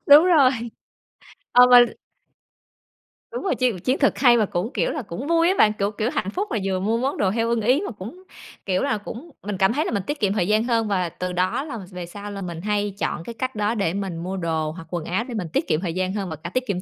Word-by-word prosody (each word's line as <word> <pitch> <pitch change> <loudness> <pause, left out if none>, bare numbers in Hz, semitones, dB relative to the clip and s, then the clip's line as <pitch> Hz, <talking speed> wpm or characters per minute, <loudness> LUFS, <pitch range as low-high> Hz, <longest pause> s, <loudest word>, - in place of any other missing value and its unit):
Đúng 290 +3 +9
rồi. 310 -8 +5 1.0
Ờ, 250 0 +7
mà 245 - +10 1.5
Đúng 480 - -5
rồi, 390 - 0
chiến 245 -8 0
chiến 255 +8 0
thuật 280 - +3
hay 245 -3 +6
mà 215 - +3
cũng, 185 +6 -3
kiểu - - 0
là, 305 - -3
cũng 230 +6 -6
vui 335 0 +3
á 380 - +2
bạn, 210 0 +5
kiểu 200 0 -1
kiểu, 215 +2 -1
hạnh 195 - -1
phúc 395 - -3
là 225 - 0
vừa 190 -1 -1
mua 220 +4 0
món 265 +4 -1
đồ 190 -2 +1
theo 230 +2 0
ưng 235 -1 +1
ý 250 +8 +3
mà - - -4
cũng, 225 - -10 0.4
kiểu 185 -2 0
là, 275 -6 0
cũng 240 +10 -9
mình 200 -1 -4
cảm 190 +4 +3
thấy 300 +4 0
là - - -2
mình 200 -3 -1
tiết 290 +9 -4
kiệm 200 -3 +1
thời 180 -4 0
gian 215 +2 +3
hơn 230 -2 +1
và 185 -4 0
từ 180 +2 -5
đó 185 +9 0
là 280 -7 -6
về 180 -1 -6
sau 205 +4 -8
là 200 -1 -6
mình 170 -2 -6
hay 205 0 -1
chọn 170 - -2
cái 235 - -7
cách 255 +2 -4
đó 210 +2 0
để 195 -6 0
mình 195 -4 -3
mua 185 +3 -4
đồ 160 -3 -1
hoặc 165 0 -10
quần 170 -3 -3
áo, 190 +7 -1
để 250 - -8
mình 200 -6 -3
tiết - - 0
kiệm 155 - +1
thời 175 -4 -3
gian 185 +1 -1
hơn 195 -4 -3
và 160 - -4
cả 155 +3 -8
tiết 255 0 -1
kiệm 190 -4 -2
210 Hz, 270 wpm, -23 LUFS, 185-250 Hz, 1.5 s, mà